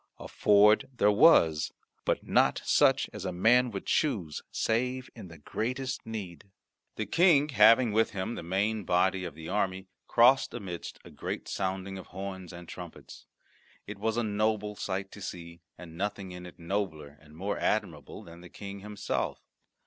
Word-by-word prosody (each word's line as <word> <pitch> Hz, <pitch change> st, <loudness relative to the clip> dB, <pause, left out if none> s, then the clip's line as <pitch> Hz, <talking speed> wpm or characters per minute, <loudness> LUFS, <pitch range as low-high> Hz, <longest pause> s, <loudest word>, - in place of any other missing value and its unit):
A -, -, -9 dB
ford 105 Hz, +3 st, +4 dB
there 105 Hz, -5 st, +3 dB
was, 100 Hz, -, +5 dB, 0.3 s
but -, -, 0 dB
not -, -, +3 dB
such -, -, +4 dB
as -, -, -7 dB
a 95 Hz, -, -2 dB
man 120 Hz, +8 st, +4 dB
would 100 Hz, -4 st, -6 dB
choose 100 Hz, -, 0 dB
save 125 Hz, +3 st, -1 dB
in -, -, -10 dB
the 85 Hz, -1 st, -12 dB
greatest 125 Hz, -, -4 dB
need. 100 Hz, -6 st, -7 dB, 0.5 s
The -, -, -3 dB
King, 165 Hz, -4 st, +4 dB
having 115 Hz, 0 st, +6 dB
with 110 Hz, +2 st, +2 dB
him 100 Hz, +3 st, -4 dB
the -, -, -6 dB
main 100 Hz, +5 st, -1 dB
body 95 Hz, +1 st, +1 dB
of 80 Hz, -, -7 dB
the 80 Hz, 0 st, -9 dB
army, 95 Hz, -1 st, -2 dB, 0.2 s
crossed 125 Hz, +3 st, +4 dB
amidst 95 Hz, -7 st, -6 dB
a -, -, -12 dB
great -, -, -5 dB
sounding 95 Hz, 0 st, -3 dB
of 95 Hz, -, -11 dB
horns 95 Hz, -1 st, -7 dB
and 85 Hz, -1 st, -10 dB
trumpets. 90 Hz, -1 st, -11 dB, 0.6 s
It -, -, -8 dB
was 110 Hz, +2 st, -1 dB
a 120 Hz, -, +1 dB
noble 105 Hz, 0 st, -1 dB
sight 95 Hz, -1 st, -4 dB
to 105 Hz, -, -11 dB
see, 85 Hz, -2 st, -8 dB, 0.2 s
and 85 Hz, -2 st, -11 dB
nothing 100 Hz, -2 st, -3 dB
in 90 Hz, 0 st, -8 dB
it 90 Hz, -, -14 dB
nobler 85 Hz, -5 st, -4 dB
and 75 Hz, -1 st, -17 dB
more 100 Hz, +3 st, -3 dB
admirable 80 Hz, -10 st, -2 dB
than 85 Hz, +1 st, -13 dB
the 90 Hz, -, -12 dB
King 100 Hz, +1 st, -8 dB
himself. 105 Hz, 0 st, -3 dB
100 Hz, 170 wpm, -29 LUFS, 90-110 Hz, 0.6 s, having